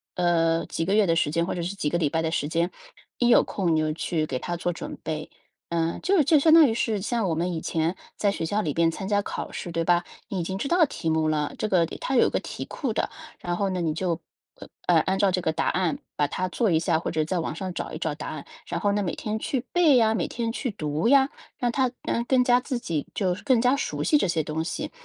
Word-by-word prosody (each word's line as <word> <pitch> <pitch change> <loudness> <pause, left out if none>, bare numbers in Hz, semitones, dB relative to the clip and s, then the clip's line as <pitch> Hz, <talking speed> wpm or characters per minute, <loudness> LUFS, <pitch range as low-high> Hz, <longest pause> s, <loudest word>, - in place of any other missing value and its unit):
呃， 165 -2 +2
几 165 - -2
个 190 - 0
月 210 0 +5
的 165 - +3
时 160 - +2
间 170 +1 +1
或 - - -3
者 175 - -3
是 185 +4 -3
几 150 -6 -1
个 170 - 0
礼 160 -4 +1
拜 160 +3 0
的 160 - 0
时 145 -3 -1
间， 170 +2 +1 0.5
一 245 - +2
有 240 - +6
空 180 -5 -1
你 - - +2
就 155 0 0
去 160 0 -1
给 130 - -3
它 175 - -3
做 175 +1 -1
准 - - -7
备。 155 -1 -4 0.4
嗯， 165 0 -1
就 380 -2 +4
就 305 +2 +4
相 315 +2 +5
当 325 -3 +8
于 - - 0
是 220 -3 0
像 225 0 0
我 170 - 0
们 170 +3 -1
以 165 - -2
前 165 +2 -1 0.2
在 205 - +1
学 180 - -3
校 205 +6 0
里 155 -7 -2
边 165 0 +3
参 190 +3 -6
加 205 0 +1
考 - - -5
试， 175 - -6
对 165 0 -1
吧？ 175 +1 +3 0.2
你 195 - -3
已 - - -1
经 190 +3 -3
知 275 - -2
道 340 +1 +4
题 165 - -4
目 160 0 +2
了， 150 -1 0
这 - - -1
个 185 -5 +3
里 - - -8
它 270 - -2
有 240 - +5
一 - - 0
个 - - 0
题 - - -6
库 260 -7 -3
的。 - - -1 0.3
然 175 0 -3
后 195 0 0
呢 180 -1 -2
你 165 -2 0
就， 170 -1 -1 0.6
呃， 175 -2 +5
按 190 +4 0
照 195 -1 +3
这 180 0 0
个 160 - 0
答 160 - -1
案 180 -4 0 0.2
把 145 - +1
它 185 +5 -2
做 220 +4 0
一 165 - +3
下， 165 -1 +1
或 - - -3
者 155 -1 0
在 180 +3 -1
网 160 - -3
上 185 +1 -4
找 - - -5
一 - - -5
找 160 -2 -2
答 150 - -7
案。 150 -3 -6 0.2
然 170 - -2
后 205 +3 +1
呢， 205 +1 +1
每 185 - -2
天 215 0 -3
去 260 +2 -2
背 335 -6 +5
呀， 220 -2 +4
每 225 - -1
天 230 -1 -3
去 250 +2 -3
读 155 -3 -2
呀， 270 +1 +5 0.3
让 245 -1 0
它 260 0 +1 0.4
更 255 -2 +4
加 245 0 +4
自 255 0 -3
己 165 - -3
就 185 -3 +1
是 180 - -9
更 260 -4 +3
加 250 +3 +3
熟 280 - -2
悉 - - +2
这 285 - +3
些 165 -2 0
东 155 +1 -3
西。 165 - -4
180 Hz, 300 characters per minute, -25 LUFS, 165-225 Hz, 0.6 s, 当